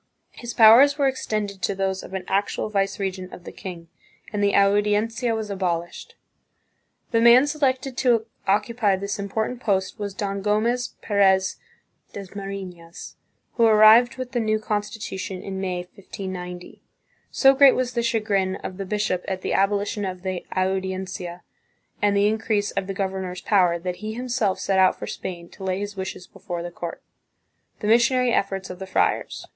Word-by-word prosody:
His 240 Hz, -1 st, -8 dB
powers 240 Hz, +6 st, +7 dB
were 280 Hz, -2 st, +3 dB
extended 215 Hz, -6 st, -3 dB
to 200 Hz, -, -1 dB
those 190 Hz, 0 st, -1 dB
of 190 Hz, -, -9 dB
an 190 Hz, -, -3 dB
actual 200 Hz, +2 st, -1 dB
viceregent 195 Hz, -2 st, -2 dB
of 175 Hz, -, -11 dB
the -, -, -8 dB
king, 175 Hz, -3 st, -9 dB, 0.5 s
and 205 Hz, -1 st, 0 dB
the 200 Hz, -, +2 dB
Audiencia 210 Hz, +4 st, +2 dB
was 215 Hz, -2 st, -4 dB
abolished. 175 Hz, -3 st, -3 dB, 1.0 s
The 230 Hz, -1 st, +3 dB
man 240 Hz, +3 st, +7 dB
selected 270 Hz, -3 st, -1 dB
to 235 Hz, -3 st, +2 dB, 0.2 s
occupy 210 Hz, +1 st, +2 dB
this 200 Hz, +2 st, -4 dB
important 220 Hz, +5 st, -2 dB
post 195 Hz, -1 st, -1 dB
was 200 Hz, -2 st, -4 dB
Don 200 Hz, 0 st, -3 dB
Gomez 225 Hz, +5 st, 0 dB
Perez 190 Hz, -2 st, +2 dB, 0.6 s
Dasmarinas, 195 Hz, -3 st, -8 dB, 0.4 s
who 230 Hz, -, +5 dB
arrived 220 Hz, +3 st, +6 dB
with 255 Hz, -1 st, -5 dB
the 245 Hz, -, -1 dB
new 215 Hz, -1 st, +1 dB
con 215 Hz, -1 st, -1 dB
stitution 195 Hz, -3 st, -6 dB
in 190 Hz, -1 st, -5 dB
May, 180 Hz, -2 st, -2 dB
1590. 180 Hz, -1 st, -8 dB, 0.5 s
So 270 Hz, -1 st, +5 dB
great 275 Hz, -1 st, +6 dB
was 255 Hz, -1 st, -1 dB
the 235 Hz, -, 0 dB
chagrin 210 Hz, -5 st, 0 dB
of 185 Hz, -1 st, -7 dB
the 195 Hz, -, -4 dB
bishop 205 Hz, -3 st, -1 dB
at 190 Hz, -1 st, -3 dB
the -, -, -1 dB
abolition 205 Hz, +1 st, 0 dB
of 185 Hz, -1 st, -5 dB
the 185 Hz, -2 st, -3 dB
Audiencia 185 Hz, -2 st, -3 dB, 0.6 s
and 205 Hz, -1 st, +3 dB
the 200 Hz, +1 st, +4 dB
increase 215 Hz, -1 st, 0 dB
of 195 Hz, -1 st, -3 dB
the 195 Hz, -, -4 dB
governor's 190 Hz, -2 st, -3 dB
power, 180 Hz, -5 st, +3 dB
that 180 Hz, +1 st, -5 dB
he 215 Hz, +3 st, -5 dB
himself 240 Hz, -5 st, -1 dB
set 195 Hz, -1 st, +1 dB
out 185 Hz, -1 st, +4 dB
for -, -, -6 dB
Spain 175 Hz, -2 st, -6 dB
to -, -, -12 dB
lay 185 Hz, -1 st, -1 dB
his 205 Hz, 0 st, -5 dB
wishes 190 Hz, -1 st, -6 dB
before 175 Hz, -1 st, -7 dB
the 175 Hz, -, -6 dB
court. 170 Hz, -1 st, -7 dB, 0.8 s
The 210 Hz, -, -2 dB
Missionary 240 Hz, +2 st, +3 dB
Efforts 195 Hz, -1 st, -1 dB
of 180 Hz, -, -9 dB
the 190 Hz, -, -7 dB
Friars. -, -, 0 dB
200 Hz, 165 wpm, -23 LUFS, 190-220 Hz, 1.0 s, powers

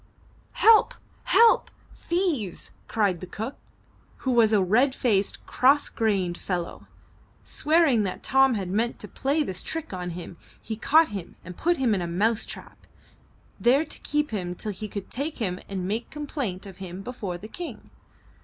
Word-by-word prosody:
''Help! 445 Hz, -1 st, +6 dB, 0.3 s
help! 465 Hz, -1 st, +5 dB, 0.2 s
thieves!" 335 Hz, -, -2 dB, 0.2 s
cried 200 Hz, -6 st, +1 dB
the 185 Hz, -, -8 dB
cook 220 Hz, +9 st, -5 dB, 0.7 s
who 260 Hz, -, +2 dB
was 230 Hz, -3 st, +5 dB
a 215 Hz, -, +4 dB
red 240 Hz, +9 st, +3 dB
faced, 205 Hz, -5 st, 0 dB
cross 280 Hz, +3 st, +3 dB
grained 195 Hz, -6 st, 0 dB
fellow. 175 Hz, -3 st, -4 dB, 0.6 s
Swearing 305 Hz, -7 st, +3 dB
that 195 Hz, -3 st, -3 dB
Tom 270 Hz, -2 st, +4 dB
had 195 Hz, -3 st, -3 dB
meant 220 Hz, +6 st, 0 dB
to 210 Hz, -, -9 dB
play 280 Hz, +8 st, 0 dB
this 185 Hz, -9 st, -4 dB
trick 325 Hz, -9 st, -5 dB
on 180 Hz, -1 st, -4 dB
him, 175 Hz, -1 st, -8 dB, 0.2 s
he 220 Hz, -, -5 dB
caught 310 Hz, +8 st, +4 dB
him 195 Hz, -4 st, -7 dB
and 180 Hz, 0 st, -8 dB
put 345 Hz, -, +1 dB
him 255 Hz, -5 st, +2 dB
in 190 Hz, -, 0 dB
a 175 Hz, -, -2 dB
mouse 210 Hz, +6 st, +1 dB
trap, -, -, -11 dB, 0.7 s
there 270 Hz, +6 st, +4 dB
to -, -, -4 dB
keep 295 Hz, -1 st, -1 dB
him 180 Hz, -4 st, -3 dB
till 210 Hz, -, -4 dB
he 210 Hz, +2 st, -6 dB
could 200 Hz, -1 st, -7 dB
take 290 Hz, +5 st, -3 dB
him 185 Hz, -6 st, -2 dB
and 190 Hz, -2 st, -3 dB
make 220 Hz, +4 st, -2 dB
complaint 270 Hz, -, -4 dB
of 190 Hz, -2 st, -10 dB
him 190 Hz, 0 st, -7 dB
before 200 Hz, -6 st, -5 dB
the 210 Hz, -, -10 dB
King. 345 Hz, +8 st, -8 dB
220 Hz, 170 wpm, -26 LUFS, 190-275 Hz, 0.7 s, Help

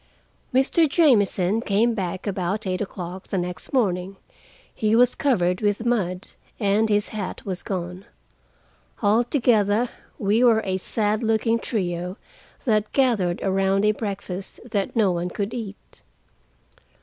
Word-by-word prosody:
Mr. 275 Hz, +5 st, +3 dB
Jamieson 220 Hz, -, +3 dB
came 225 Hz, +3 st, +2 dB
back 185 Hz, -3 st, -4 dB
about 195 Hz, +1 st, -2 dB
eight 185 Hz, -1 st, -1 dB
o'clock 185 Hz, -2 st, -6 dB
the 195 Hz, -, -2 dB
next 180 Hz, 0 st, -4 dB
morning: 195 Hz, -7 st, 0 dB, 0.6 s
he 215 Hz, 0 st, +1 dB
was 245 Hz, +1 st, +5 dB
covered 180 Hz, -10 st, +1 dB
with 205 Hz, +2 st, 0 dB
mud, 190 Hz, -6 st, -1 dB, 0.3 s
and 210 Hz, +1 st, +2 dB
his 205 Hz, -1 st, +1 dB
hat 210 Hz, -4 st, -5 dB
was 190 Hz, -2 st, -3 dB
gone. 180 Hz, 0 st, -5 dB, 1.0 s
Altogether, 230 Hz, 0 st, +3 dB, 0.3 s
we 210 Hz, +4 st, +2 dB
were 225 Hz, -3 st, +5 dB
a 190 Hz, -1 st, 0 dB
sad 210 Hz, +2 st, -1 dB
looking 225 Hz, 0 st, +1 dB
trio 180 Hz, -5 st, -3 dB, 0.5 s
that 215 Hz, -3 st, +1 dB
gathered 220 Hz, -10 st, +1 dB
around 195 Hz, +1 st, +2 dB
a 210 Hz, -, +5 dB
breakfast 195 Hz, -3 st, -5 dB
that 200 Hz, 0 st, -1 dB
no 210 Hz, -5 st, +3 dB
one 175 Hz, 0 st, -2 dB
could 200 Hz, +4 st, -3 dB
eat. 215 Hz, -5 st, -8 dB
205 Hz, 130 wpm, -24 LUFS, 185-225 Hz, 1.0 s, was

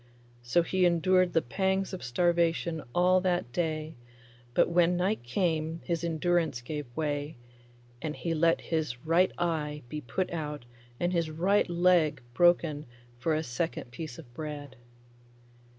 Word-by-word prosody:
So 120 Hz, +9 st, +2 dB
he 185 Hz, +2 st, 0 dB
endured 180 Hz, +1 st, +3 dB
the 165 Hz, -, +3 dB
pangs 190 Hz, +8 st, 0 dB
of 185 Hz, -, -5 dB
starvation 170 Hz, +4 st, +1 dB
all 180 Hz, +1 st, +4 dB
that 175 Hz, -9 st, 0 dB
day, 155 Hz, -2 st, -2 dB, 0.6 s
but -, -, +5 dB
when 175 Hz, 0 st, +3 dB
night 190 Hz, +5 st, 0 dB
came 160 Hz, +4 st, -1 dB
his 170 Hz, -1 st, -2 dB
endurance 165 Hz, -4 st, +1 dB
gave 145 Hz, +3 st, -5 dB
way, 145 Hz, -1 st, -2 dB, 0.6 s
and 155 Hz, -1 st, -3 dB
he 170 Hz, -, -2 dB
let 165 Hz, +1 st, +3 dB
his 155 Hz, -6 st, -2 dB
right 170 Hz, +3 st, +4 dB
eye 150 Hz, -4 st, -2 dB
be 150 Hz, +2 st, -4 dB
put 180 Hz, +10 st, -2 dB
out 150 Hz, -5 st, -4 dB, 0.3 s
and 175 Hz, +1 st, 0 dB
his 170 Hz, -2 st, +1 dB
right 180 Hz, +6 st, +2 dB
leg 170 Hz, -4 st, +3 dB
broken 165 Hz, -1 st, +3 dB, 0.3 s
for 155 Hz, +5 st, +1 dB
a 155 Hz, -, -1 dB
second 160 Hz, 0 st, -3 dB
piece 150 Hz, +1 st, -7 dB
of 130 Hz, -7 st, -13 dB
bread. 145 Hz, -2 st, -6 dB
165 Hz, 145 wpm, -29 LUFS, 150-175 Hz, 0.6 s, but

